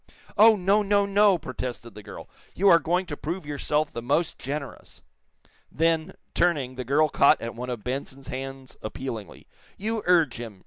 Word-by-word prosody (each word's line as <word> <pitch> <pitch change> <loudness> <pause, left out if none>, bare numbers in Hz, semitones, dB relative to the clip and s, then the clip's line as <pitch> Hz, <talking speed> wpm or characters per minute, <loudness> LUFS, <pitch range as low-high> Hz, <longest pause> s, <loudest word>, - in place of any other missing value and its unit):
"Oh, 220 +1 +7
no, 200 +2 +2
no, 200 0 +2
no!" 200 -1 +4
protested 125 -5 -6
the 105 - -10
girl. - - -10 0.3
"You 195 +2 +4
are 170 - +7
going 180 +3 0
to 150 - -5
prove 170 +4 -5
yourself 150 +1 -1
the 115 - -5
most 145 +7 0
generous." 140 0 -7 0.7
Then, 165 +2 0 0.2
turning, 145 -8 +1
the 130 0 -5
girl 145 +5 +3
caught 140 - +4
at 115 0 -5
one 125 +2 -6
of 120 -4 -5
Benson's 135 +1 -5
hands 135 0 -7
appealingly. 110 -2 -7 0.3
"You 220 +2 -2
urge 165 -8 +3
him!" 115 -5 -8
145 Hz, 170 wpm, -26 LUFS, 125-180 Hz, 0.7 s, Oh